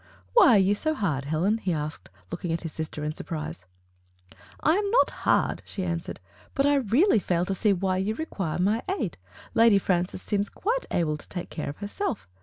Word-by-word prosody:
*' - - -32
"Why 385 - +7
are - - +7
you 195 +1 +4
so 310 +9 -1
hard, 155 - -1
Helen? 175 +9 +1
he 185 - -1
asked, 150 - -4 0.2
looking 175 - -3
at 165 - -1
his 165 - -5
sister 155 -1 -5
in 150 0 -2
surprise. 155 - -6 0.9
"I 315 +3 +3
am 405 0 0
not 480 +4 +4 0.2
hard, - - +2
she 190 - -5
answered, 170 -2 -3 0.4
"but 275 - +2
I 290 - +4
really 270 - +4
fail 175 -2 0
to 195 - -1
see 205 +2 +2
why 190 0 +1
you 200 +4 -1
require 195 - -3
my 205 +6 +2 0.2
aid. 205 - -3 0.4
Lady 230 -2 +6
Fran 180 -2 +1
cis 185 - -10
seems 205 -1 0
quite 485 +5 -2
able 155 -3 0
to - - -15
take 175 -2 -5
care* 155 - -4
of 145 - -7
herself. 210 - -3
195 Hz, 210 wpm, -26 LUFS, 165-230 Hz, 0.9 s, Why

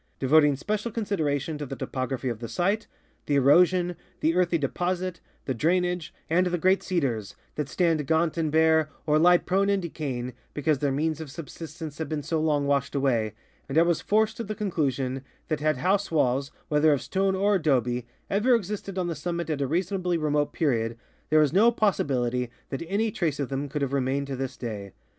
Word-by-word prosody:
4), 135 - -1
devoting 150 0 +5
special 210 - -2
consid 205 -4 -2
eration 150 0 -1
to 145 - -3
the 135 - -5
topography 130 0 -3
of 115 -3 -2
the 115 - -5
site, 195 - 0 0.4
the 145 - +2
erosion, 175 +6 +4 0.3
the 160 - +3
earthy 175 -1 +2
de 145 -3 0
posits, 180 +2 -2 0.2
the 130 - -1
drainage, 175 +5 0 0.2
and 180 +3 +2
the 175 0 0
great 185 +3 +3
cedars 125 - -2 0.2
that 150 -2 -3
stand 160 0 +1
gaunt 160 +1 +2
and 160 -3 0
bare 160 0 +4 0.2
or 150 0 +3
lie 175 +2 +6
prone 195 +3 +1
and 200 -2 +1
decajdng 130 -7 -4 0.2
because 150 -1 +1
their 140 -1 +1
means 155 +3 -1
of 155 - -7
subsistence 160 0 -8
have 160 -3 -3
been 150 -2 -2
so 160 +1 -1
long 150 -2 +1
washed 140 -1 0
awa}^ 120 -6 +1 0.4
and 135 - -1
I 165 - +7
was 170 -2 +1
forced 220 +1 +1
to 230 - -3
the 215 0 -5
conclu 175 -9 0
sion 130 0 -3 0.3
that 155 -2 0
had 155 -1 +1
house 195 +7 +1
walls, 140 -3 +1 0.2
whether 150 +1 +4
of 140 - -1
stone 190 0 0
or 200 +2 +2
adobe, 125 - +1 0.2
ever 230 +6 +3
existed 200 -2 -4
on 185 - 0
the 170 - -2
summit 170 +2 -3
at 145 -2 -2
a 140 - +1
reasonably 180 +2 0
remote 150 -2 0
period, 115 -7 0 0.3
there 155 0 +5
is 150 - 0
no 220 +5 +6
possi 215 -8 +1
bilit}'' 125 -2 0 0.2
that 135 - -4
any 210 +4 0
trace 160 -8 -1
of 140 - -2
them 140 +1 -3
could 145 +1 -2
have 140 0 -2
remained 135 +1 0
to 140 -1 -4
this 130 0 -4
day. 105 -5 -6
155 Hz, 205 wpm, -26 LUFS, 140-180 Hz, 0.4 s, I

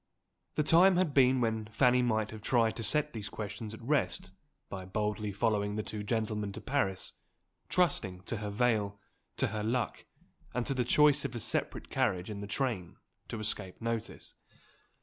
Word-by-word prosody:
The 150 - +2
time 175 +5 +6
had 175 -5 +2
been 130 -1 +5
when 110 -2 0
Fanny 125 +3 +4
might 110 -3 +1
have 110 -1 -8
tried 115 0 +2
to 115 - -4
set 150 +5 +1
these 105 -3 -4
questions 105 +1 -6
at 115 - -13
rest 115 -8 0 0.4
by 95 -1 -6
boldly 105 +2 -2
following 105 0 0
the 110 - -1
two 105 0 -5
gentlemen 105 -1 -1
to - - -6
Paris; 95 -10 -1 0.6
trusting 100 - +1
to 110 +5 -4
her 105 0 -4
veil, 105 -2 +1 0.4
to - - +2
her 105 0 -3
luck, 115 +3 -1 0.5
and 125 -1 0
to - - +1
the 125 -2 0
choice 150 +2 +5
of - - -4
a - - -2
separate - - -2
carriage 90 +3 0
in 100 -1 -5
the 100 - -5
train, 110 -6 -2 0.3
to 115 - -5
escape 105 -3 -3
notice. 115 -1 -4
110 Hz, 175 wpm, -32 LUFS, 105-125 Hz, 0.6 s, time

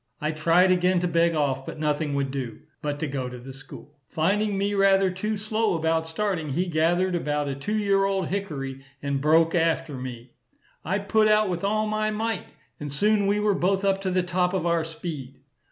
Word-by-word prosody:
I 150 +1 -1
tried 170 +4 +3
again 180 0 +3
to 180 - +1
beg 170 0 +2
off; 135 -3 0
but - - -7
nothing 150 -1 -1
would 140 -1 -1
do, 130 -4 -5 0.2
but 145 -1 -2
to 160 - 0
go 135 -3 -3
to 125 - -8
the 130 +2 -10
school. 140 +2 -12
Finding 200 +5 +1
me 200 +1 0
rather 195 -1 +4
too 210 +4 -2
slow 215 -2 0
about 160 0 0
starting, 165 -2 -2
he 180 +6 +1
gathered 175 +2 +1
about 150 -4 -1
a 140 - -2
two 140 +11 -2
year 200 -2 +2
old 195 -3 -1
hickory, 140 -9 -4 0.2
and 140 -1 -1
broke 160 +2 +4
after 165 -2 +1
me. 125 -1 -8 0.5
I 185 +4 0
put 215 +2 +2
out 215 -1 +4
with 175 0 -3
all 215 +2 +1
my 215 0 0
might, 220 -1 -2 0.3
and 145 -1 -5
soon 205 +7 +2
we 205 +1 +2
were 210 -1 +2
both 195 +1 +1
up 195 0 +2
to 190 - -1
the 185 0 +1
top 180 +1 0
of 180 - -1
our 170 -1 +2
speed. 150 -5 -7
175 Hz, 205 wpm, -25 LUFS, 150-195 Hz, 0.5 s, rather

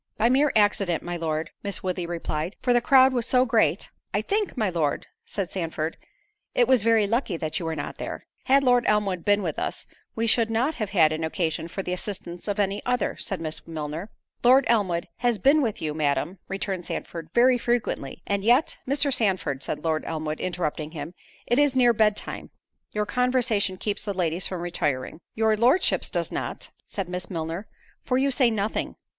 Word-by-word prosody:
"By 230 - +3
mere 275 +3 +4
accident, 205 -5 +2
my 175 0 -4
Lord," 160 -1 -2
Miss 200 -1 -4
Woodley 180 -2 -2
replied, 170 +1 -3
"for 245 - +3
the 240 - +4
crowd 260 +1 +6
was 240 -3 0
so 255 0 +4
great——" 240 - +2 0.3
"I - - +1
think, 410 -6 -1
my 220 -4 +1
Lord," 165 -6 -1 0.2
said 195 -3 -4
Sandford, 165 -3 -3 0.6
"it 245 - +4
was 260 -3 +4
very 225 -1 +4
lucky 225 -4 0
that 155 -1 -2
you 165 - -4
were 160 - -2
not 145 -1 -6
there." - - -5 0.2
"Had 275 +1 +4
Lord 245 -2 +4
Elmwood 200 -5 +1
been 205 0 +3
with 160 -4 -2
us, - - -3 0.3
we 230 - 0
should 230 0 +3
not 240 +7 +1
have 210 - -1
had 165 -6 +4
occasion 160 +1 -2
for 195 +3 -5
the 180 - -2
assistance 180 -2 -5
of 205 - -1
any 200 0 0
other," 250 -3 0
said 195 - -3
Miss 160 0 -5
Milner. 160 +4 -5 0.3
"Lord 255 +3 +6
Elmwood 190 -7 +1
has 240 -2 +1
been 280 +10 +4
with 225 - -2
you, 155 -1 -1
Madam," 155 +4 -1
returned 195 -2 -3
Sandford, 165 -2 -5
"very 250 +1 +5
frequently, 235 - -2
and 200 -1 -1
yet—" 245 +7 +3
"Mr. 280 +1 +1
Sandford," 185 - 0
said - - -4
Lord 160 -1 0
Elmwood, 155 -1 -3
interrupting 160 -3 -3
him, 165 +2 -6 0.3
"it 240 +3 +2
is 290 -2 +3
near 245 -2 +5
bed 210 -1 +3
time, - - -7 0.4
your 210 0 -1
conversation 240 -4 +1
keeps 205 +2 -3
the 200 -2 -3
ladies 175 0 +1
from 185 -2 -5
retiring." 150 -4 -2
"Your 220 0 +3
Lordship's 250 - +3
does - - -2
not," - - -5 0.2
said 195 -3 -4
Miss 180 0 -5
Milner, 165 +3 -4 0.4
"for 255 - +1
you 275 +1 +2
say 250 -2 +4
nothing." 215 -1 -2
200 Hz, 190 wpm, -25 LUFS, 170-240 Hz, 0.6 s, crowd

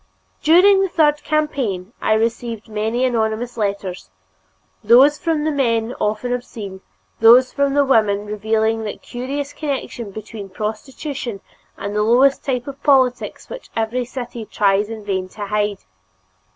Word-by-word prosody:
During 375 +5 +6
the 385 - +1
third 300 -3 +2
campaign 255 - -1
I 220 - +2
received 230 0 -1
many 220 +3 -1
anonymous 230 0 -1
letters 200 - -3 0.7
those 260 +7 +6
from 320 -3 0
the 310 - +1
men 235 -4 0
often 215 +4 -1
obscene, 210 -6 -6 0.4
those 245 +3 +6
from 280 -1 +1
the 285 -1 +4
women 210 -5 +2
revealing 220 +1 0
that 210 - -6
curious 275 +4 -5
connection 275 -7 -4
between 210 0 -8
prostitution 220 +3 -5 0.4
and 200 +1 -5
the 210 - +2
lowest 250 +5 +4
type 250 -3 -2
of 280 -1 -9
politics 260 -4 +2
which - - -9
every 230 +3 -1
city 245 -2 -6
tries 205 0 +1
in 220 -2 -7
vain 190 -2 -2
to 205 +2 -6
hide. 205 -1 -1
230 Hz, 140 wpm, -20 LUFS, 210-275 Hz, 0.7 s, During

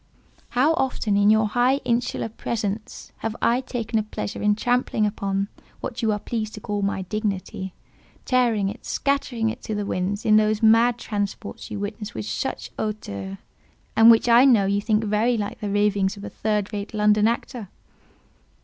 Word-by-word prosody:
How 290 +6 +5
often, 260 -9 0
in 205 +1 +4
your 220 0 +4
high 245 +4 +3
insular 240 -1 0
presence, 215 -1 -4
have 225 0 -4
I 240 +2 +2
taken 230 -3 -2
a - - +1
pleasure 105 - -5
in 210 0 +3
trampling 245 -1 +1
upon, 200 -1 -1 0.3
what 240 - -5
you 220 -2 +2
are 210 - 0
pleased 215 0 -4
to - - -7
call, 205 -1 -3
my 195 -1 -1
dignity; 190 -2 -4 0.5
tearing 235 -6 +2
it, 195 - -6
scattering 250 -5 0
it 245 - -9
to 215 - -4
the 205 0 -2
winds, 200 +2 -2
in 215 -1 +6
those 215 0 +2
mad 230 +2 +5
transports 205 -2 -4
you - - -5
witness 205 +1 -5
with 110 - -4
such 110 +1 -4
hauteur, 100 - -4 0.6
and 225 +1 +8
which 230 +1 +6
I 235 +1 +7
know 235 -7 +5
you 200 +1 +1
think 215 0 +1
very 220 +3 +1
like 205 -1 -4
the 205 - -3
ravings 205 -1 +1
of 200 - -10
a - - -5
third 210 -1 -1
rate 205 +2 -5
London 210 0 +4
actor." 235 -2 -3
215 Hz, 175 wpm, -24 LUFS, 205-230 Hz, 0.6 s, and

